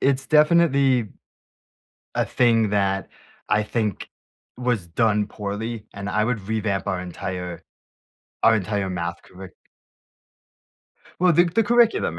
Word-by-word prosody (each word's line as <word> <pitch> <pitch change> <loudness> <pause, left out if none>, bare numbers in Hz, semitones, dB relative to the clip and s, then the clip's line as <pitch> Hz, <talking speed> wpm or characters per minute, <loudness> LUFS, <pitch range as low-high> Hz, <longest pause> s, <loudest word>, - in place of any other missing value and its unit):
it's 135 0 +1
definitely 140 - +3 1.1
a - - +2
thing 115 -4 +2
that 95 -1 0 0.4
I 105 0 +2
think 105 -3 -3 0.5
was 120 -7 -1
done 105 +3 +1
poorly, 105 +2 -5
and 100 0 -6
I 105 +2 +1
would 120 -2 -1
revamp 105 -3 -1
our 95 - -1
entire 90 0 -6 0.8
our 115 - +6
entire 100 -1 -2
math 85 -1 -4
curric 95 0 -12 1.7
Well, 180 -1 +4
the 175 +3 +5
the 190 +6 +1
curriculum, 235 0 +2
110 Hz, 120 wpm, -23 LUFS, 100-130 Hz, 1.7 s, our